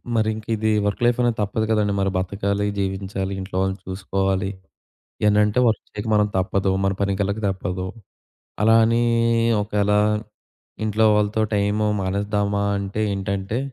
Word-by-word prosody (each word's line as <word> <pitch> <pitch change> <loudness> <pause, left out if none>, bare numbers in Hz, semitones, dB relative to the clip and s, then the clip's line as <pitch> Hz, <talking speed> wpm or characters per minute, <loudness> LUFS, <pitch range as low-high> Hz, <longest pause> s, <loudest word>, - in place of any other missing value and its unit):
మరి 110 -1 +2
ఇంకిది 110 0 -1 0.2
work 100 - -2
life 120 0 +3
అనేది 120 -2 +1
తప్పదు 105 +2 -1
కదండీ. 105 -2 +2
మరి 95 0 +1
బతకాలి, 100 +2 -1
జీవించాలి, 95 0 -3
ఇంట్లో 95 0 -8
వాళ్ళని 95 +1 -1
చూసుకోవాలి. 95 +1 -1 0.8
ఏన్నంటే 105 +3 +3
వర్క్ 110 -2 0
చేయక 105 +2 -6
మనం 105 0 +3
తప్పదు. 95 +1 +1
మన 95 - +2
పని‌కెళ్లక 100 +1 0
తప్పదు. 95 -1 -3 0.8
అలా 110 +1 +5
అనీ 115 +1 +2 0.6
ఒకేలా 105 0 +1 0.9
ఇంట్లో 110 +1 +1
వాళ్ళతో 105 +1 +1 0.2
టైము 105 +1 +1
మానేద్దామా 100 +1 -1 0.2
అంటే 100 +2 -4
ఏంటంటే 100 +2 -2
100 Hz, 130 wpm, -22 LUFS, 95-105 Hz, 0.9 s, అలా